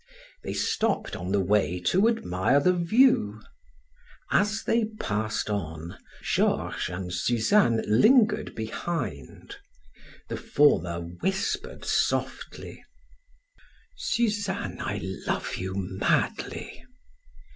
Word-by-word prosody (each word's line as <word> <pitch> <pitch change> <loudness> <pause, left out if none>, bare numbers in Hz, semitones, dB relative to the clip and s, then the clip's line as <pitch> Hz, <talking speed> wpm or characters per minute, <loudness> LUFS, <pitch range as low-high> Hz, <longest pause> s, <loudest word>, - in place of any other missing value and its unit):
They - - -4
stopped 220 -2 0
on 90 +1 -5
the 100 - +2
way 95 -3 +1
to 190 - +3
admire 125 - +2
the 180 +6 +3
view; 175 - +3 0.9
as 210 +2 +2
they 230 -1 +2
passed 110 0 -2
on, 85 -5 -4 0.3
Georges - - 0
and 90 0 -5
Suzanne 120 - +2
lingered 215 - +4
behind. 110 - -5 0.7
The - - -4
former 85 - +2
whispered 190 - -3
softly: - - -2 1.1
"Suzanne, 205 -4 -1
I - - -3 0.3
love - - -2
you 95 +1 -4
madly." 95 0 -2
110 Hz, 90 wpm, -27 LUFS, -, 1.1 s, lingered